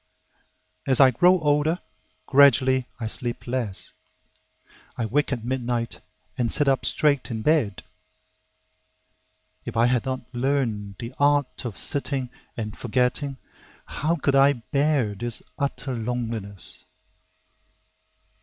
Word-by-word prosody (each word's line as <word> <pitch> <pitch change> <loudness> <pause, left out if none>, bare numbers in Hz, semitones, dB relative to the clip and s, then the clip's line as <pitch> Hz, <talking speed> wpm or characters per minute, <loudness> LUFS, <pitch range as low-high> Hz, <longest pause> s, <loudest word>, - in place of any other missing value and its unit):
As 130 -2 +3
I 135 -2 +8
grow 180 +9 +4
older, 150 +3 +2 0.5
gradually 130 -1 +5
I 115 - -3
sleep 120 +2 -2
less; 120 -6 -2 1.1
I 120 - -1
wake 145 +7 0
at 120 -4 -3
midnight 120 -2 -2 0.4
and 120 -2 +1
sit 145 - +1
up 135 -1 +2
straight 145 -3 +1
in 110 -2 -4
bed. 145 -10 +1 1.8
If - - -6
I 115 - +5
had 125 -1 +2
not 130 -1 -3
learned 120 -6 -1
the 115 +2 -7
"art 145 -2 +2
of 110 -5 -5
sitting 140 -4 0 0.3
and 110 -2 -4
forgetting," 125 +3 -1 0.5
How 160 +3 -1
could 140 -3 0
I 135 +1 +6
bear 140 -2 0
this 120 +3 -2 0.2
utter 140 -1 -2
loneliness? 115 -4 -4
130 Hz, 115 wpm, -24 LUFS, 115-140 Hz, 1.8 s, I